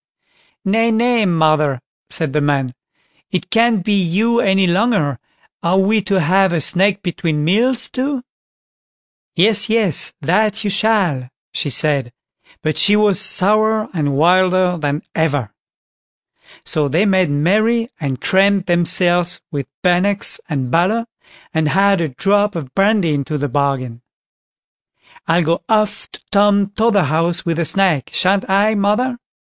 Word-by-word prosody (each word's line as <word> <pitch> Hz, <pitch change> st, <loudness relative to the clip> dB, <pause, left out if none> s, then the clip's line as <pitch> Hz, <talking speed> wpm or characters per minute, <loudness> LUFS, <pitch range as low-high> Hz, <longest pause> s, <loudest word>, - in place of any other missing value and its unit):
"Nay, 225 Hz, +4 st, +1 dB
nay, 230 Hz, -1 st, +1 dB
mother", 155 Hz, -5 st, +1 dB, 0.3 s
said 155 Hz, -5 st, -3 dB
the 150 Hz, -, 0 dB
man, 140 Hz, -3 st, -1 dB, 0.6 s
"it 185 Hz, 0 st, -4 dB
can't 230 Hz, -4 st, +2 dB
be 210 Hz, -, +1 dB
you 215 Hz, +7 st, 0 dB
any 195 Hz, -2 st, +2 dB
longer; 180 Hz, -, 0 dB, 0.4 s
are 170 Hz, +3 st, +1 dB
we 205 Hz, +3 st, +2 dB
to 195 Hz, 0 st, 0 dB
have 185 Hz, +3 st, +2 dB
a 170 Hz, -, 0 dB
snack 195 Hz, +6 st, +1 dB
between 165 Hz, -4 st, -2 dB
meals 235 Hz, +9 st, +2 dB
too?" 265 Hz, 0 st, -3 dB, 1.1 s
"Yes, 210 Hz, +4 st, +2 dB
yes, 215 Hz, -, 0 dB
that 210 Hz, +8 st, 0 dB
you 205 Hz, -, -1 dB
shall", 190 Hz, -, 0 dB, 0.2 s
she 145 Hz, -, -2 dB
said; 140 Hz, -2 st, 0 dB, 0.5 s
but 155 Hz, 0 st, -1 dB
she 205 Hz, -, +4 dB
was 210 Hz, -3 st, +3 dB
sourer 215 Hz, +2 st, +1 dB
and 145 Hz, -5 st, -1 dB
wilder 180 Hz, +3 st, +2 dB
than 150 Hz, -2 st, -3 dB
ever. 145 Hz, -9 st, -1 dB, 1.1 s
So 150 Hz, -2 st, 0 dB
they 165 Hz, +9 st, +1 dB
made 190 Hz, -4 st, +2 dB
merry, 215 Hz, +11 st, +1 dB
and 135 Hz, -5 st, -4 dB
crammed 195 Hz, +2 st, +1 dB
themselves 175 Hz, 0 st, +2 dB
with 140 Hz, -3 st, -4 dB, 0.2 s
bannocks 185 Hz, +3 st, +2 dB
and 135 Hz, -5 st, -3 dB
butter, 200 Hz, +9 st, +1 dB, 0.5 s
and 160 Hz, -2 st, 0 dB
had 195 Hz, +2 st, +2 dB
a 160 Hz, -, -2 dB
drop 205 Hz, +9 st, 0 dB
of 140 Hz, -6 st, -7 dB
brandy 195 Hz, -5 st, +1 dB
into 145 Hz, +1 st, -3 dB
the 145 Hz, 0 st, -3 dB
bargain. 130 Hz, -3 st, -2 dB, 1.3 s
"I'll 170 Hz, +1 st, +2 dB
go 165 Hz, +2 st, -1 dB
off 215 Hz, -1 st, 0 dB
to -, -, -12 dB
Tom 200 Hz, -1 st, +2 dB
Totherhouse 175 Hz, -7 st, 0 dB
with 165 Hz, -1 st, -2 dB
a 170 Hz, -, 0 dB
snack—shan't 190 Hz, +2 st, 0 dB
I, 200 Hz, +3 st, +2 dB
mother?" 220 Hz, +5 st, -1 dB
185 Hz, 135 wpm, -17 LUFS, 155-210 Hz, 1.3 s, she